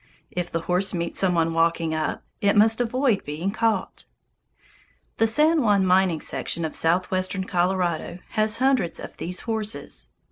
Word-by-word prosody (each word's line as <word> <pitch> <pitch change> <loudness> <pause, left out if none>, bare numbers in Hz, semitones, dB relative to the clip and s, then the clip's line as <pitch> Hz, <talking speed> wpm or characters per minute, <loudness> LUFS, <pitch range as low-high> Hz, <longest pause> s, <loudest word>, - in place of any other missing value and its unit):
If 180 -1 -3
the 165 - -1
horse 180 +3 0
meets 170 -1 -2
some 185 -2 +2
one 165 0 +1
walking 165 0 +1
up, 155 -1 -2 0.2
it 200 0 +3
must 220 +3 +4
avoid 245 -2 +1
being 155 +7 -3
caught. 225 +1 -1 1.1
The 225 - +3
San 305 +7 +3
Juan 205 -5 +3
mining 185 -3 +3
section 170 - -2
of 155 - -5
southwestern 185 +3 0
Colorado 180 -2 -1
has 215 0 +1
hundreds 260 -9 +1
of - - -8
these 180 +2 -5
horses. 210 - -4
185 Hz, 150 wpm, -24 LUFS, 170-220 Hz, 1.1 s, must